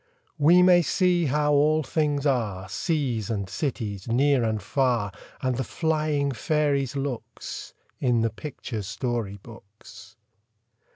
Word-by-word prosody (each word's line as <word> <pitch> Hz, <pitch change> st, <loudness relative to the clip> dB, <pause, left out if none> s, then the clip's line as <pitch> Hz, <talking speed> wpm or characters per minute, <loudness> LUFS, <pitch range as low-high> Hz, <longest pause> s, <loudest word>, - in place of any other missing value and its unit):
We 170 Hz, +5 st, +6 dB
may 180 Hz, -1 st, +6 dB
see 175 Hz, 0 st, +2 dB
how 150 Hz, +2 st, +2 dB
all 155 Hz, +2 st, +3 dB
things 145 Hz, 0 st, 0 dB
are, 105 Hz, -9 st, 0 dB
Seas 125 Hz, -, -1 dB
and 100 Hz, -4 st, -2 dB
cities, 105 Hz, -, -4 dB
near 130 Hz, +2 st, +3 dB
and 110 Hz, -1 st, 0 dB
far, 120 Hz, -1 st, 0 dB, 0.3 s
And 130 Hz, -2 st, 0 dB
the 130 Hz, -, 0 dB
flying 155 Hz, -1 st, 0 dB
fairies' 140 Hz, 0 st, 0 dB
looks, 135 Hz, -4 st, -5 dB, 0.2 s
In 120 Hz, -3 st, +2 dB
the 115 Hz, -1 st, +1 dB
picture 115 Hz, -3 st, -6 dB
story 110 Hz, 0 st, -3 dB
books. 110 Hz, -1 st, -14 dB
130 Hz, 125 wpm, -25 LUFS, 110-150 Hz, 0.3 s, We